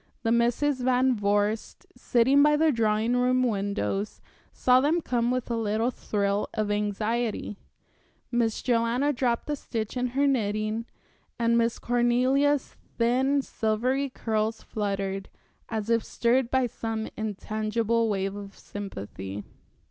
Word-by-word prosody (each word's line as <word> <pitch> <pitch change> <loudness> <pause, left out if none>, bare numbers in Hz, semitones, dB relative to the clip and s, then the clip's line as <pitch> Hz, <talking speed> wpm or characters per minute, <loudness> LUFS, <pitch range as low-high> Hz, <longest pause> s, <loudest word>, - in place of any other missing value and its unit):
The 225 - +1
Misses 245 +4 +2
Van 255 0 +3
Vorst, 205 +1 -1
sitting 260 +3 +3
by 300 +1 +5
the 315 0 +4
drawing 225 0 +1
room 255 +1 +2
windows, 200 - -1 0.3
saw 255 0 +4
them 310 +5 +2
come 240 -6 0
with 250 -1 -2
a - - +1
little 225 +2 0
thrill 205 -3 -1
of 215 -1 0
anxiety. 210 +1 -1 0.7
Miss 235 -2 0
Joanna 245 +4 +1
dropped 240 -2 0
a - - +1
stitch 225 -5 -4
in 250 0 0
her 285 - +4
knitting, 215 -3 0 0.5
and 235 0 +2
Miss 230 0 +2
Cornelia's 255 +4 +2 0.2
thin, 260 +4 +2
silvery 255 +6 0
curls 220 -2 -2
fluttered, 195 -2 -3 0.4
as 220 -2 -3
if 230 -1 +3
stirred 240 +1 +1
by 260 0 +2
some 225 -1 -4
intangible 220 +2 -1
wave 195 -1 -1
of 200 -1 -9
sympathy. 100 - -7
230 Hz, 130 wpm, -27 LUFS, 210-250 Hz, 0.7 s, by